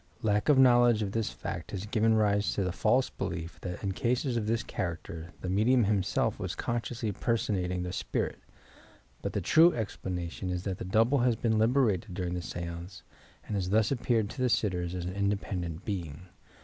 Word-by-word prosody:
Lack 105 +4 +1
of 145 - +6
knowledge 120 -4 +6
of 100 - -3
thb 115 0 -1
fact - - -6
has 100 0 -4
given 110 0 +2
rise 105 -1 +2
to 100 - 0
the 90 - -1
false 120 +7 +2
belief 85 0 -5
that 90 +1 -6
in 100 - 0
cases 125 +5 0
of 110 -2 -1
this 115 +1 0
character 85 -1 -5
the - - -4
medium 110 +7 +3
himself 100 -2 +1
was - - -3
consciously 115 -1 -2
personating 95 -5 -1
the 90 0 -4
spirit, - - -2 0.8
but - - -3
the - - -1
true 165 +2 +6
explanation 90 -4 -4
is 90 0 -2
that 95 -2 -3
the - - -5
double 115 +8 +3
has 120 -1 +3
been 110 0 +1
liberated 110 -5 +2
during 90 -2 -2
the 90 - -2
stance 85 +2 -6 0.4
and - - -5
has 95 -2 -1
thus 110 +4 +3
appeared 120 -4 +1
to 130 - -6
the 125 - +3
sitters 90 -6 0
as 90 -1 -4
an 90 - -4
independent 100 -4 -2
being. 85 -6 -4
100 Hz, 190 wpm, -30 LUFS, 90-115 Hz, 0.8 s, of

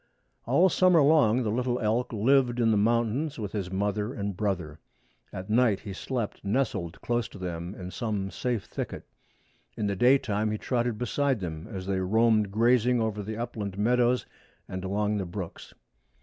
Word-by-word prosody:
All 140 +10 +5
summer 185 -2 +4
long 135 -5 +4
the 105 - -1
little 125 +2 0
elk 110 +3 0
lived 125 +2 +2
in 115 -2 +3
the - - +3
mountains 115 +7 +1
with 105 -4 -4
his 100 -4 -3
mother 105 +4 -1
and 100 -1 -3
brother. 90 -7 -2 0.5
At 95 0 -7
night 110 -3 +3
he 100 -3 -7
slept 115 +2 -4
nestled 100 -6 -1
close 120 -2 -1
to - - -12
them 90 0 -5
in 90 -1 -7
some 105 -4 -3
safe 120 -6 -2
thicket. - - -6 0.7
In 105 - -1
the 100 -1 0
daytime 110 -2 +3
he 105 - -1
trotted 120 -1 -1
beside 130 +2 0
them 80 -1 -5
as 95 -5 -6
they 95 -1 -1
roamed 110 +2 +3
grazing 120 +3 +3
over 110 -2 -1
the 110 +2 -5
upland 110 -5 -4
meadows 120 +3 +2 0.4
and 95 0 -5
along 105 +2 0
the 95 - -2
brooks. 90 -1 -7
110 Hz, 170 wpm, -28 LUFS, 100-120 Hz, 0.7 s, All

